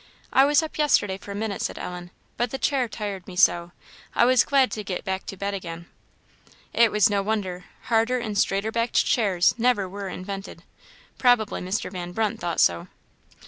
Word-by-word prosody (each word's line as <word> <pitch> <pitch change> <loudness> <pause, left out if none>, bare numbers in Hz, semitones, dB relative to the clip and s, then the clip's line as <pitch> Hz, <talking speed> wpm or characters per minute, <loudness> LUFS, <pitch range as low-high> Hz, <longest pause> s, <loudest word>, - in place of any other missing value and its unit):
"I 270 - +6
was 295 +3 +4
up 315 - -7
yesterday 205 -10 +2
for - - -13
a 200 - -5
minute," 210 -1 -3
said - - -3
Ellen; 180 0 -6 0.3
"but 240 +1 -1
the 270 - -4
chair 265 -3 +1
tired 205 -5 -6
me 185 - -9
so, 175 -2 +3 0.4
I - - +5
was 255 0 +5
glad 270 -2 +3
to 210 - -4
get 185 -2 -4
back 190 -1 -4
to 195 - -6
bed 200 +1 -3
again." 170 -3 -6 0.9
It 230 -1 +4
was 210 -2 +4
no 205 -1 0
wonder; 195 -3 -3 0.2
harder 230 +2 +2
and 220 -4 -4
straighter 200 +1 +1
backed 230 +1 +1
chairs 195 -6 +3
never 230 -5 +2
were 195 +1 -6
invented. 195 +1 -7 0.6
Probably 245 -4 +3
Mr. 185 +1 -3
Van 175 -2 -6
Brunt 220 0 -1
thought 170 -1 -2
so. 85 -1 +3
205 Hz, 185 wpm, -25 LUFS, 185-235 Hz, 0.9 s, I